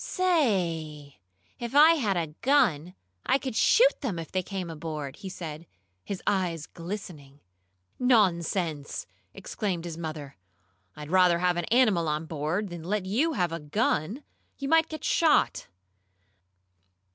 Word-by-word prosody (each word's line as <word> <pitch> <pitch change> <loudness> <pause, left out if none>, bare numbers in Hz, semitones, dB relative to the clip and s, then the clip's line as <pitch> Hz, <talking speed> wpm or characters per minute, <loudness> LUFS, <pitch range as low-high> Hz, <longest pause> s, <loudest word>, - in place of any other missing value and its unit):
"Say, 170 - -1 0.4
if 240 +2 -5
I 305 +3 +8
had 220 - +1
a 160 -3 -3
gun 190 - +2 0.3
I - - +3
could 265 -4 -5
shoot - - +4
them, 225 - -2
if 165 -1 -7
they 185 - 0
came 185 -2 -5
aboard," 150 -3 -6
he 195 -2 -7
said, 165 -3 -8 0.4
his 195 - -6
eyes 175 -5 0
glistening. 165 -6 -8 0.6
"Nonsense!" 175 - +1 0.3
exclaimed 185 -6 -4
his 165 -1 -6
mother. 155 -4 -6 0.6
"I'd 150 +1 -9
rather 180 -2 +5
have 180 0 +1
an 175 - -1
animal 215 -8 +3
on 155 +1 -1
board 160 +6 -2
than 170 -2 -8
let 195 +2 -2
you 265 +13 +1
have 175 - 0
a 165 - -4
gun. 155 - -1 0.3
You 275 -1 -4
might 325 0 +4
get 310 - -7
shot." 295 - +2
180 Hz, 140 wpm, -27 LUFS, 160-230 Hz, 0.6 s, I